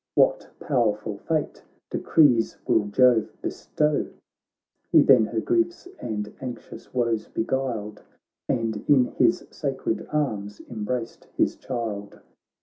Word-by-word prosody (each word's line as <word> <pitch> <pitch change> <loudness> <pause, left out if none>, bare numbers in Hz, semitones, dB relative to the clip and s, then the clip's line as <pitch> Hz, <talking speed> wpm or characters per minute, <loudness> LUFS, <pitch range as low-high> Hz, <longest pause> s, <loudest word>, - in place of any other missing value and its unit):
What - - +3
powerful 105 -3 0
fate 155 -2 -2 0.3
decrees 125 -8 +3
will 105 - +2
Jove 120 +1 +4
bestow! 150 -1 0 0.4
' - - -52
He - - +7
then 125 -5 +6
her 115 - -2
griefs 345 - 0
and 105 -2 -4
anxious 125 -3 -8
woes 115 -3 0
beguiled, 115 -4 -2 0.5
And 115 -3 -1
in 135 -4 +6
his - - +3
sacred - - -3
arms 105 -9 -2
embraced 115 +1 -4
his - - +2
child. 110 -5 -5
115 Hz, 115 wpm, -25 LUFS, 105-130 Hz, 0.5 s, He